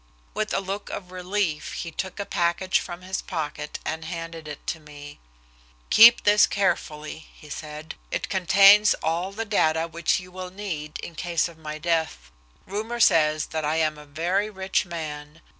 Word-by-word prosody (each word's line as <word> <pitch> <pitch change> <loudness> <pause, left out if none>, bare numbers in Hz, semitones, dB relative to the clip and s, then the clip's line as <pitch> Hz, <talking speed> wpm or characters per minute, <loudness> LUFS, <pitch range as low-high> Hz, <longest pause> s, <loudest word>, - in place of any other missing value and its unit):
With 215 0 -2
a - - +1
look 195 +1 -5
of 180 -2 -7
relief 185 -3 -2
he 170 - -5
took 190 +4 -5
a 200 - -2
package 175 +1 +1
from 175 0 -8
his 190 +1 -3
pocket 150 -3 -4
and 160 +1 -3
handed 165 -1 -6
it 150 -1 -8
to 160 - -3
me. 145 -1 -12 0.7
"Keep 230 +2 +9
this 205 0 +6
carefully," 155 -5 -2
he 150 - -15
said. 150 +1 -7 0.2
"It - - -2
contains 200 +3 +6
all 170 +4 -1
the 225 +3 -4
data 165 -6 +2
which 165 +1 0
you 180 0 -12
will 185 0 -7
need 170 -6 -5
in 170 - -7
case 170 +1 0
of 165 -2 -14
my 155 -1 -6
death. 160 - -1 0.3
Rumor 220 +5 -4
says 155 -7 +4
that 160 -1 -1
I 150 +1 0
am 155 -2 0
a 150 - -13
very 175 +8 0
rich 190 -2 -1
man. 150 -2 -6
170 Hz, 175 wpm, -25 LUFS, 155-190 Hz, 0.7 s, Keep